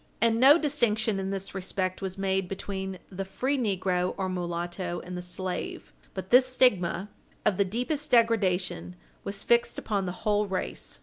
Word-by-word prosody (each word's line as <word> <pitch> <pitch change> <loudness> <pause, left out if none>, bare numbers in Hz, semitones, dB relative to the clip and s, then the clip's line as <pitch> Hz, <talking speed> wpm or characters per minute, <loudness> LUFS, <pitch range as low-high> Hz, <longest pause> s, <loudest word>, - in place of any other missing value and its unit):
And 230 0 +3
no 275 +5 +8
distinction 225 -9 +1
in 190 0 -2
this 195 0 -4
respect 185 0 -2
was 190 0 -4
made 190 -1 0
between 190 0 -4
the 195 +1 -3
free 255 +9 -1
negro 185 -6 0
or 190 -1 -1
mulatto 175 0 -3
and 180 0 -7
the 180 - -4
slave, 180 +1 -5 0.2
but 190 -1 -6
this 255 +1 +7
stigma 205 -8 +2 0.4
of 190 - +3
the 200 - +3
deepest 250 +9 -2
degradation 190 - +2 0.3
was 200 0 -4
fixed 235 0 +2
upon 200 -3 -1
the - - -1
whole 210 -1 +2
race. 185 - -3
195 Hz, 165 wpm, -28 LUFS, 185-225 Hz, 0.4 s, no